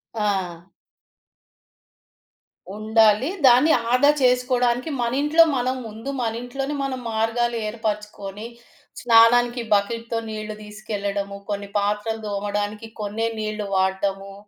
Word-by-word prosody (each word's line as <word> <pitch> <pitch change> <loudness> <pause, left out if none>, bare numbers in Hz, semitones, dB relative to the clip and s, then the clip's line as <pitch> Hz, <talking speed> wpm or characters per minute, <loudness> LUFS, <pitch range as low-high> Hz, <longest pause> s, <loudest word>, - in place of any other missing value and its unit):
ఆ! 190 -5 -2 2.1
ఉండాలి. 220 +3 +3 0.2
దాన్ని 255 +6 +6 0.2
ఆదా 270 +3 +5
చేసుకోవడానికి 250 +1 +2
మనింట్లో 290 +7 +4
మనం 255 +1 0
ముందు 225 +5 -8
మనింట్లోనే 245 +5 -3
మనం 260 -2 -3
మార్గాలు 235 +2 0
ఏర్పరచుకొని, 210 -1 -5 0.5
స్నానానికి 240 +1 +5
బకిటుతో 230 +3 0
నీళ్ళు 215 0 -5
దీసకెళ్లడము, 205 -1 -4
కొన్ని 200 0 -4
పాత్రలు 210 +2 -1
దోమడానికి 205 +2 -3
కొన్నే 215 +2 -2
నీళ్లు 215 -1 -3
వాడ్డము. 195 +1 -1
220 Hz, 90 wpm, -23 LUFS, 205-245 Hz, 2.1 s, దాన్ని